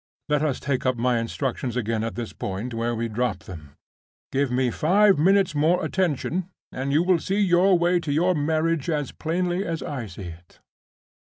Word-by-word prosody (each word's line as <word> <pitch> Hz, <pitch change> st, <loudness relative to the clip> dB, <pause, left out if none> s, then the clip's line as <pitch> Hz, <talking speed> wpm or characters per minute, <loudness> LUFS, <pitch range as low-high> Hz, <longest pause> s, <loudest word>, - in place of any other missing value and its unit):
Let 150 Hz, -1 st, +2 dB
us 150 Hz, -4 st, 0 dB
take 140 Hz, -3 st, -2 dB
up 130 Hz, -1 st, +1 dB
my 120 Hz, 0 st, +1 dB
instructions 120 Hz, +1 st, -3 dB
again 115 Hz, -2 st, -1 dB
at 115 Hz, -, -4 dB
the 120 Hz, -, -3 dB
point 105 Hz, +6 st, -4 dB
where 115 Hz, +1 st, -1 dB
we 115 Hz, +1 st, -2 dB
dropped 120 Hz, +3 st, -2 dB
them. 75 Hz, -6 st, -11 dB, 0.6 s
Give 140 Hz, 0 st, +1 dB
me 125 Hz, -1 st, +1 dB
five 195 Hz, -, +4 dB
minutes' 195 Hz, +2 st, +3 dB
more 155 Hz, +4 st, +2 dB
attention, 180 Hz, 0 st, -1 dB, 0.2 s
and 135 Hz, +2 st, -3 dB
you 155 Hz, +4 st, +3 dB
will 180 Hz, -1 st, +3 dB
see 195 Hz, +5 st, -1 dB
your 185 Hz, -1 st, +4 dB
way 175 Hz, +1 st, +2 dB
to 160 Hz, -4 st, -4 dB
your 175 Hz, +5 st, +2 dB
marriage 160 Hz, 0 st, 0 dB
as 150 Hz, -4 st, -1 dB
plainly 175 Hz, +3 st, -1 dB
as 165 Hz, -4 st, -3 dB
I 130 Hz, -6 st, -4 dB
see 95 Hz, 0 st, -9 dB
it. 85 Hz, +1 st, -20 dB
145 Hz, 185 wpm, -24 LUFS, 120-175 Hz, 0.6 s, five